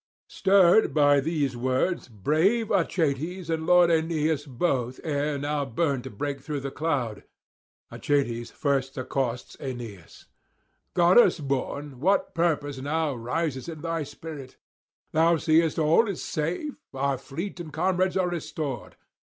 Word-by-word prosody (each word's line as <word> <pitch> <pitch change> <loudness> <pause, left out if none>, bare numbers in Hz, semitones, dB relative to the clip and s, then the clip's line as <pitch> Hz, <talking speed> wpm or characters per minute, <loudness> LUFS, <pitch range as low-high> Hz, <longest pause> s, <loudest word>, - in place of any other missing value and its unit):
Stirred 190 +1 +4
by 145 -1 +5
these 145 -3 -1
words 130 +8 0
brave 160 - +1
Achates 165 -1 0
and 160 0 -2
lord 180 -1 +6
Aeneas 160 -2 0
both 130 -2 -1
ere 145 -1 -1
now 145 +1 -1
burned 135 0 -1
to - - -5
break 140 +5 -4
through 145 0 -4
the 135 0 -4
cloud. 135 -10 -2 0.7
Achates 120 -5 -1
first 135 -2 -1
accosts 130 -2 -3
Aeneas: 115 -9 -8 0.7
'Goddess 175 +1 +5
born, 140 -1 -3
what 195 +8 +1
purpose 150 -5 0
now 150 +2 -1
rises 130 +4 -3
in 160 -2 -7
thy 165 0 -2
spirit? 145 -2 -8 0.5
Thou 165 +1 +4
seest 160 +1 +2
all 160 +8 +4
is 200 - -4
safe, 175 - -2 0.2
our 135 -1 0
fleet 175 +7 -6
and 165 -3 -7
comrades 185 +3 +1
are 185 -1 +1
restored. 155 -6 -5
150 Hz, 130 wpm, -26 LUFS, 135-170 Hz, 0.7 s, lord